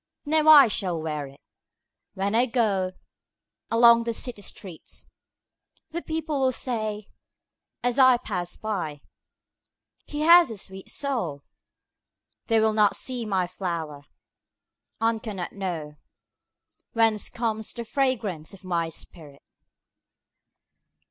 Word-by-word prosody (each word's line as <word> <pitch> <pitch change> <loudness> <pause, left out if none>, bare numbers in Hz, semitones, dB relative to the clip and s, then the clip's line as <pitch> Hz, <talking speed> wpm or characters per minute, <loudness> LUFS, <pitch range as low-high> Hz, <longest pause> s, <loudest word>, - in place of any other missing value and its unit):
Now 310 +1 +2
I 290 -4 +10
shall 185 -5 -2
wear 150 -3 -4 0.9
itWhen 200 +2 -1
I 245 +2 +3
goAlong 230 +2 +1
the 230 0 -2
city 235 -2 -2
streets:The 200 - -10
people 315 -3 -3
will 260 -1 +3
sayAs 225 +2 -5
I 260 -2 +7
pass 180 -7 -4
by—"He 200 - -8
has 335 -1 +7
a 225 - -6
sweet 190 0 -8
soul!"They 225 - -5
will 220 0 +2
not 210 -2 +3
see 245 -4 -3
my 190 -3 +1
flower, 170 -5 -5 0.9
And 225 -1 +1
cannot 195 -6 -5 1.4
knowWhence 225 -2 +2
comes 220 -2 -2
the 235 -1 -7
fragrance 220 - -1
of 195 - -19
my 170 -3 -1
spirit! 150 -4 -9
220 Hz, 95 wpm, -25 LUFS, 180-245 Hz, 1.4 s, I